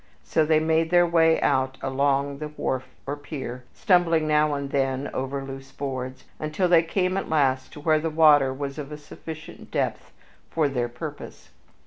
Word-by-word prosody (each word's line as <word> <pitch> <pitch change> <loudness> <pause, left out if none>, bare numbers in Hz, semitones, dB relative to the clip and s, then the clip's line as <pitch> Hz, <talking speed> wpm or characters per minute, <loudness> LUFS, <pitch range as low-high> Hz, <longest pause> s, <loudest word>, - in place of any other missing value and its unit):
So 160 - +2
they 155 -1 +4
made 160 +1 +1
their 175 0 +5
way 165 -1 +4
out 130 0 +1
along 140 +1 0
the 150 - -4
wharf 130 -3 -3 0.2
or 140 - -3
pier, 135 -4 -7
stumbling 170 -6 +2
now 150 -1 +3
and 140 -1 -4
then 135 0 0
over 135 +1 -3
loose 135 0 -9
boards, 130 -2 -5 0.2
until 155 +4 0
they 170 -2 +6
came 185 +2 0
at 195 - -3
last 135 -4 +1
to - - -9
where 155 +1 +3
the 165 +1 -1
water 150 -4 +5
was 140 +2 -5
of 145 0 -6
a 150 - -5
sufficient 155 +1 -10
depth - - -2 0.4
for 160 -3 +1
their 125 -3 -1
purpose. 120 - -8
145 Hz, 175 wpm, -25 LUFS, 135-160 Hz, 0.4 s, they